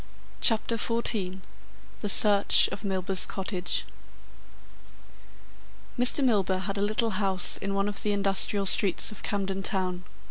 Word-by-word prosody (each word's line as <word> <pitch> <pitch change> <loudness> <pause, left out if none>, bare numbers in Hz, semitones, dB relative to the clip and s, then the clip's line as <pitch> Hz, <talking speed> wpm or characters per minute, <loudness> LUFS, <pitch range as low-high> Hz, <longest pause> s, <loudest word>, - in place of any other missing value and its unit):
CHAPTER 230 0 0
XIV 210 -5 -1 0.6
THE 205 - -2
SEARCH 205 0 +6
OF 200 - -10
MILBURGH'S 190 -1 -1
COTTAGE 185 -2 -5 2.1
Mr. 250 +3 +3
Milburgh 195 -6 -2
had 195 0 -6
a - - -4
little 215 +2 -2
house 190 -2 +3
in 195 0 -6
one 195 +1 -3
of 205 -1 -6
the 210 - -3
industrial 200 0 +1
streets 195 +1 +1
of 215 - -13
Camden 195 -1 -5
Town. 185 -2 -2
200 Hz, 130 wpm, -24 LUFS, 190-210 Hz, 2.1 s, SEARCH